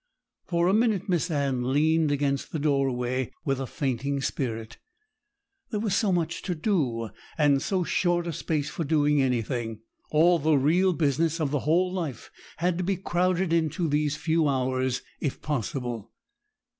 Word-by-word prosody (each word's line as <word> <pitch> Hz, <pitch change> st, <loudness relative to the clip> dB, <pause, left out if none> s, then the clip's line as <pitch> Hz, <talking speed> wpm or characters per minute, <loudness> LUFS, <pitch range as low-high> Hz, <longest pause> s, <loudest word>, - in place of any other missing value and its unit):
For 170 Hz, -1 st, +1 dB
a 190 Hz, -, +3 dB
minute 215 Hz, -3 st, +2 dB
Miss 180 Hz, -2 st, +1 dB
Anne 140 Hz, -5 st, 0 dB
leaned 155 Hz, +2 st, +3 dB
against 140 Hz, -1 st, -1 dB
the -, -, -2 dB
doorway, 130 Hz, -4 st, 0 dB
with 135 Hz, -2 st, 0 dB
a 135 Hz, -, -3 dB
fainting 140 Hz, +1 st, -2 dB
spirit. 115 Hz, -5 st, -3 dB, 0.9 s
There 210 Hz, -, -2 dB
was 210 Hz, -3 st, 0 dB
so 210 Hz, -4 st, +2 dB
much 170 Hz, -2 st, -1 dB
to 180 Hz, -, -3 dB
do, 140 Hz, -, 0 dB, 0.3 s
and 145 Hz, -3 st, +4 dB
so 185 Hz, +2 st, 0 dB
short 175 Hz, 0 st, +1 dB
a 170 Hz, -, -3 dB
space 150 Hz, 0 st, -1 dB
for 165 Hz, -, -3 dB
doing 150 Hz, -1 st, +3 dB
anything. 120 Hz, -3 st, -1 dB, 0.3 s
All 170 Hz, +3 st, +4 dB
the 155 Hz, 0 st, +3 dB
real 175 Hz, +7 st, +3 dB
business 160 Hz, +1 st, +1 dB
of 150 Hz, -4 st, 0 dB
the 145 Hz, -, +1 dB
whole 180 Hz, +3 st, +3 dB
life 160 Hz, -10 st, -4 dB, 0.3 s
had 175 Hz, +1 st, 0 dB
to -, -, 0 dB
be 190 Hz, +1 st, 0 dB
crowded 180 Hz, -1 st, 0 dB
into 165 Hz, +1 st, +1 dB
these 150 Hz, 0 st, +1 dB
few 160 Hz, 0 st, +1 dB
hours, 130 Hz, -1 st, 0 dB, 0.2 s
if 145 Hz, -, -3 dB
possible. 120 Hz, -5 st, -3 dB
150 Hz, 160 wpm, -27 LUFS, 135-175 Hz, 0.9 s, and